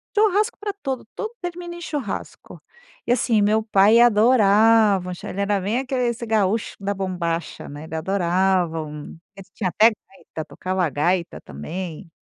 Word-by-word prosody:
Churrasco 425 +2 +2
para 415 -1 -4
tudo, 265 -3 -3
tudo 440 +1 -5
termina 350 -1 -6
em 345 - -10
churrasco. 290 - -6 0.4
E - - 0
assim, 235 -3 +2
meu 215 +2 +3
pai 215 +1 +5
adorava 215 -4 +4
um - - -4
chu 175 - -9
ele 200 - -4
era 200 0 +1
bem 210 +6 -1
aquele 260 -2 -1
esse 235 0 -3
gaúcho 215 -1 0
da 200 0 -2
bombacha, 175 -3 -3
né, 145 +1 -9
ele 160 - -7
adorava 180 -1 +1
um 150 +1 -9 0.2
ele 195 -1 -12
tinha 190 -4 -2
até 220 +6 +5 0.2
gaita, 160 -4 -9
tocava 185 +4 -3
a - - -1
gaita 170 +4 -1
também. 160 - -7
200 Hz, 165 wpm, -22 LUFS, 180-240 Hz, 0.4 s, pai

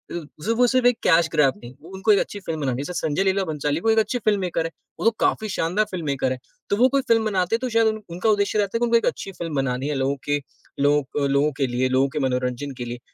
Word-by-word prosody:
उ - - -2 0.2
वो - - -11
सब 225 +1 +1
वो 245 0 +5
सिर्फ 255 0 +2
एक 245 -2 +4
कैश 165 -1 +4
ग्रैब 150 -4 +3
नहीं, 120 +1 -9
वो 165 - -13
उनको 195 +3 +2
एक 200 - +5
अच्छी 205 - -3
फ़िल्म 165 -5 -5
बनानी 135 -3 0
है। - - -3
जैसे 180 - -5
संजय 155 +5 0
लीला 195 0 +1
भंसाली 150 -1 -1
वो 225 - +1
एक 220 - +3
अच्छे 245 +3 0
फ़िल्ममेकर 190 -7 0
हैं, 165 - -4 0.3
वो - - -3
तो 230 - +6
काफ़ी 215 - +1
शानदार 190 +3 0
फ़िल्ममेकर 140 -7 -1
हैं। 130 - -3 0.3
तो - - +2
वो 250 +3 +6
कोई 275 +1 +2
फ़िल्म 225 -1 +3
बनाते 190 -1 +1
हैं - - -2
तो 255 - -2
शायद 225 -1 +3 0.2
उनका 180 +6 -1
उद्देश्य 205 0 +2
रहता 205 +2 0
है - - -4
कि 240 - +2
उनको 235 0 +4
एक 230 - -1
अच्छी 195 - -2
फ़िल्म 165 -4 -5
बनानी 135 0 -1
है 150 - -1
लोगों 135 +1 0
के 145 0 +2 0.5
लोग 145 -1 +1
लोगों 140 +2 +2
के 135 -2 +1
लिए, 125 +1 0
लोगों 130 +1 +3
के 150 +2 -3
मनोरंजन 125 +1 -1
के 120 - -5
लिए। 120 0 -6
165 Hz, 280 wpm, -23 LUFS, 140-215 Hz, 0.5 s, तो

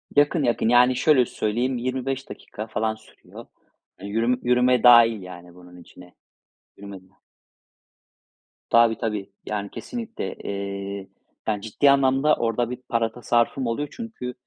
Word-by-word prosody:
Yakın, 145 +2 +3
yakın. 120 -2 +1
Yani, 125 +1 +5
şöyle 130 -1 +4
söyleyeyim, 120 +4 -2
25 130 +2 -3
dakika 110 -3 -8
falan 110 0 -2
sürüyor. 110 - -15 0.5
Hani, 100 - -8
yürüme 115 +4 +1
yürüme 125 0 +3
dâhil 115 -3 +7
yani 90 -1 -12
bunun 90 0 -15
içine. 90 0 -16 0.6
Yürüme 100 -1 -10
dâhil. 95 0 -28 1.5
Tabii, 115 -1 +4
tabii. 105 -4 -4 0.2
Yani, 100 -1 -4
kesinlikle. 230 -2 -6
Eee, 100 0 -6 0.4
yani, 105 -2 -1
ciddi 115 +7 +2
anlamda 140 +2 +3
orada 115 +1 -1
bir 125 - -5
para 115 -2 0
tasarrufum 120 +2 0
oluyor 130 +6 -2
çünkü 225 - -7
115 Hz, 135 wpm, -23 LUFS, 100-125 Hz, 1.5 s, dâhil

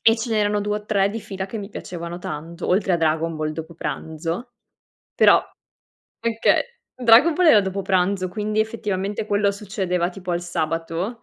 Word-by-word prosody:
e 225 0 +5
ce 230 +1 -4
n'erano 210 -1 +1
2 210 +1 -1
o 210 - -7
3 200 -2 +2
di 225 - -4
fila 190 -1 -5
che 225 - -6
mi 200 -1 -6
piacevano 175 -3 -7
tanto, 165 +1 -6
oltre 190 0 +2
a - - +4
Dragon 160 0 0
Ball 155 0 -2
dopo 160 +2 -7
pranzo. 165 +9 -4 0.6
Però - - +6 0.8
okay. 230 0 +2 0.3
Dragon 250 +6 +6
Ball 360 0 +3
era 220 -9 +8
dopo 190 0 -3
pranzo, 185 0 +1
quindi 210 +3 -1
effettivamente 210 -2 -2
quello 205 -1 +2
succedeva 190 -4 -2
tipo 185 0 -7
al 175 0 0
sabato, 165 +5 -3
195 Hz, 170 wpm, -22 LUFS, 170-215 Hz, 0.8 s, era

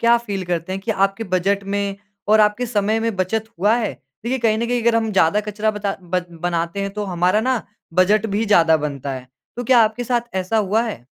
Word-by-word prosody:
क्या 235 0 +5
फील 200 -5 -4
करते 175 +1 -2
हैं 195 - -3
कि 220 - -3
आपके 195 +2 0
बजट 190 +2 0
में 200 0 -2 0.3
और 215 +1 +6
आपके 210 +4 +2
समय 215 -1 0
में 225 -1 -1
बचत 200 +4 -1
हुआ 210 +5 +4
है? 230 -3 -1 0.3
देखिए 260 +2 -1
कहीं 220 -2 +2
न 235 - -1
कहीं 245 -1 0
अगर 230 0 +3
हम 225 -1 0
ज़्यादा 190 +2 +3
कचरा 215 +1 0
बता 205 -2 -3
बद 180 0 -2 0.2
बनाते 170 +2 -1
हैं, 200 - -2
तो 210 +1 -4
हमारा 180 +2 +1
ना 250 0 0 0.3
बजट 205 +4 +3
भी 215 +2 -1
ज़्यादा 165 -5 +5
बनता 140 -3 -4
है। 130 -1 -7 0.3
तो 245 - -4
क्या 250 +1 +5
आपके 220 +3 -2
साथ 240 -2 -2
ऐसा 190 +4 -1
हुआ 215 +2 +2
है? 215 - -5
205 Hz, 225 wpm, -20 LUFS, 185-225 Hz, 0.3 s, और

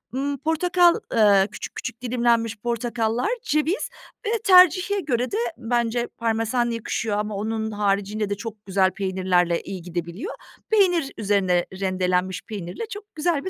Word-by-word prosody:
ımm, 280 +1 -1
portakal, 345 +4 +3 0.2
eee, 205 -3 +5
küçük - - -8
küçük 230 - -6
dilimlenmiş 235 -2 +1
portakallar, 235 - -1
ceviz 305 +5 0 0.4
ve - - 0
tercihe 370 +1 +6
göre 255 -7 -1
de 415 - -1 0.2
bence 235 0 0
parmesan 230 +1 0
yakışıyor 225 -2 -2
ama 210 0 -2
onun 220 +2 -2
haricinde 205 0 0
de 205 - -1
çok 215 0 -8
güzel 190 -1 +2
peynirlerle 185 -3 +1
iyi 190 -2 -7
gidebiliyor. 175 - -5 0.3
Peynir, 360 -9 +3
üzerine 195 -4 +2 0.2
rendelenmiş 185 -1 0
peynirle 195 - -5
çok 415 -1 -10
güzel 315 0 0
bir - - -1
225 Hz, 140 wpm, -24 LUFS, 195-285 Hz, 0.4 s, tercihe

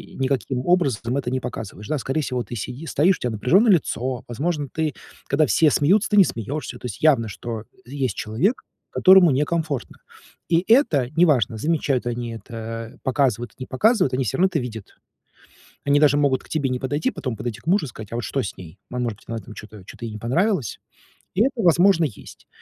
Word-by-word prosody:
никаким 130 -1 -1
образом 135 - +1
это 130 -3 -2
не 130 0 -1
показываешь, 105 -2 -7
да? 155 - 0
Скорее 135 +3 -1
всего, 125 -4 -2
ты 120 - -8
сиди 125 +7 -6
стоишь, 165 +4 +2
у - - -28
тя 125 - -1
напряжённое 170 - +3
лицо, 130 -6 -1
возможно, 145 +4 -2
ты 155 -2 -1 0.3
когда 150 +3 +3
все 155 +3 +4
смеются, 190 +10 +3
ты 210 - +2
не 200 - +9
смеёшься. 130 - -4
То - - -10
есть 115 -5 -6
явно, 135 -8 +4
что 110 +1 -6 0.2
есть 130 -4 -2
человек, 145 - -1 0.3
которому 185 -3 +6
некомфортно. 150 0 -1 0.5
И 170 0 +3
это 165 - +4
неважно, 140 - +3
замечают 145 -2 0
они 120 -1 -3
это, 115 +1 -7
показывают, 130 -4 0
не 130 - -6
показывают, 180 - +2
они 130 +1 +1
всё 105 - -2
равно 185 - +4
это 190 -4 0
видят. 115 -5 -7 0.9
Они 145 0 +4
даже 145 -1 +4
могут 140 -3 +2
к - - -18
тебе 145 -4 0
не 125 0 -1
подойти, 145 +4 -1
потом 125 -4 -5
подойти 110 -1 -5
к - - -27
мужу 180 -1 +2
и - - -8
сказать, 110 -3 -10
а - - -2
вот 120 - -3
что 135 - -1
с 100 - -5
ней? 90 +1 -11
Ма 125 - -4
может 120 -4 -2
быть, - - -22
она 115 - -3
там 110 +1 -11
чё-то 105 -2 -11
чё-то 120 - -10
ей 115 - -5
не 105 - -7
понравилось? 140 - 0 0.6
И 190 - +2
это, 270 - +2
возможно, 175 0 +4
есть. 125 -9 -10
130 Hz, 205 wpm, -22 LUFS, 115-160 Hz, 0.9 s, не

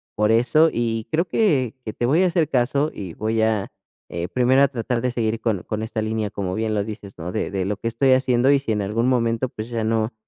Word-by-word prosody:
por 105 +1 +2
eso 155 +8 +4
y 115 -2 -2
creo 165 +2 +2
que 140 - +1
que 110 - -4
te 120 - -2
voy 155 +9 +3
a - - +4
hacer 170 -3 +1
caso 140 +4 +1
y 95 -5 -7
voy 110 +1 -1
a, 110 -3 0 0.4
eh, 85 0 -4
primero 130 +2 +3
a - - +5
tratar 120 -2 -2
de 125 0 0
seguir 115 -2 -1
con 105 -6 -1
con 110 0 -4
esta 110 0 -3
línea, 110 -1 -2
como 95 -2 -3
bien 110 0 -1
lo 100 - +1
dices, 105 -2 -8
¿no?, 85 +1 -5
de - - -2
de 95 -1 -1
lo 100 +1 -2
que 115 - -4
estoy 130 +3 +2
haciendo 130 0 +3
y 140 - +4
si 125 -5 -3
en 105 - -1
algún 115 +5 0
momento, 115 0 +1
pues, 110 0 -7
ya 115 -2 -2
no 110 0 0
115 Hz, 250 wpm, -22 LUFS, 110-130 Hz, 0.4 s, a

